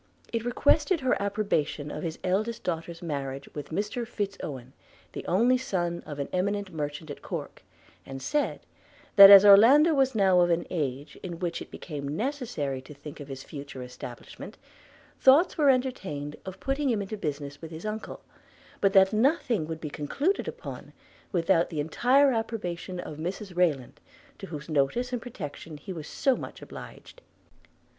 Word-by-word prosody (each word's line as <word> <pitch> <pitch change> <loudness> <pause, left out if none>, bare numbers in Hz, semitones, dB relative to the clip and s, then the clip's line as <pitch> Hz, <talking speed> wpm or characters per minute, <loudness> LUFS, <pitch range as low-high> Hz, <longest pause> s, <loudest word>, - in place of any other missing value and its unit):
It 230 -1 -1
requested 290 +7 +2
her 260 -1 +2
approbation 200 -8 -1
of 150 - -5
his 165 -1 -4
eldest 215 +5 -1
daughter's 170 0 -4
marriage 140 -3 -4
with 145 - -7
Mr 210 +7 -3
Fitz 205 -4 -3
Owen, 130 -3 -7 0.4
the - - -6
only 240 +8 +3
son 175 -8 -2
of 145 - -6
an 140 - -3
eminent 200 +1 -1
merchant 150 0 -4
at - - -9
Corke; - - -6 0.4
and 135 0 -8
said, 295 - -1 0.5
that 195 -1 +12
as 200 0 +11
Orlando 255 +11 +8
was 265 -3 +2
now 190 -3 +4
of 175 0 +4
an 170 0 +1
age 145 -4 -3
in 175 -2 -6
which 175 -1 -3
it - - -8
became 145 -4 -6
necessary 225 - -3
to 145 +3 -13
think 145 +1 -10
of 145 - -8
his 135 -2 -7
future 140 -3 -8
establishment, 125 0 -10 0.6
thoughts 285 +7 +5
were 295 -4 +4
entertained 195 - -1
of 190 - -7
putting 275 +1 -1
him 215 -4 0
into 200 +2 -5
business 145 -6 -5
with 165 - -7
his 160 +4 -9
uncle; 215 +1 -5 0.6
but 195 -1 +2
that 190 0 +6
nothing 235 - +1
would 160 0 -5
be 150 -2 -6
concluded 285 - -1
upon 475 +1 -8 0.4
without 170 -2 +2
the 155 - -4
entire 255 - +3
approbation 185 -6 -3
of 155 -4 -7
Mrs 180 +3 -5
Rayland, 155 -9 0 0.4
to - - -7
whose 150 -2 -7
notice 160 - 0
and 245 - -2
protection 160 - -8
he 185 +6 -7
was 160 -4 -7
so 270 -3 +1
much - - -8
obliged. - - -11
180 Hz, 165 wpm, -27 LUFS, 150-235 Hz, 0.6 s, that